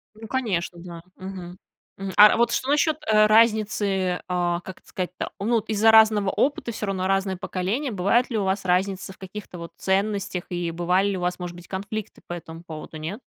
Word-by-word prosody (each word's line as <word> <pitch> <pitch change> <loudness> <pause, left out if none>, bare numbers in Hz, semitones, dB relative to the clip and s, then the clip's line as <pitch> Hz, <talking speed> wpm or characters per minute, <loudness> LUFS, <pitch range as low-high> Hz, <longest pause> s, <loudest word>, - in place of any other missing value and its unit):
Ну, 220 0 -10
конечно, 185 -9 -2
да, 170 -1 -9 0.2
мгм, 185 -1 -8 0.4
м. 195 -1 -5
А 210 0 +9
вот 235 - +3
что 260 - -1
насчёт, 305 +1 +3
э, 215 -1 +5
разницы, 210 -4 +2
а, 175 -1 0
как 185 0 -10
это - - -31
сказать-то, 180 -1 -4
о? 200 - -5
Ну, 235 +1 +2
вот 220 0 -1
из-за 220 +1 +4
разного 215 -3 +6
опыта 265 -1 0
всё 210 -1 -4
равно 190 -1 -1
разное 195 0 +1
поколение. 210 +11 -2
Бывает 205 +7 +2
ли 225 - -1
у 200 - 0
вас 190 +1 0
разница 190 +1 0
в - - -23
каких-то 190 -1 -9
вот 170 - -8
ценностях? 195 -1 -1
И 175 -2 -2
бывали 180 +4 +1
ли 190 - -2
у - - -5
вас, 180 0 -1
может 175 -1 -6
быть, 175 0 -13
конфликты 200 +2 -5
по 175 - -5
этому 165 0 -9
поводу, 155 -1 -8
нет? 165 +9 -5
195 Hz, 205 wpm, -24 LUFS, 180-215 Hz, 0.4 s, А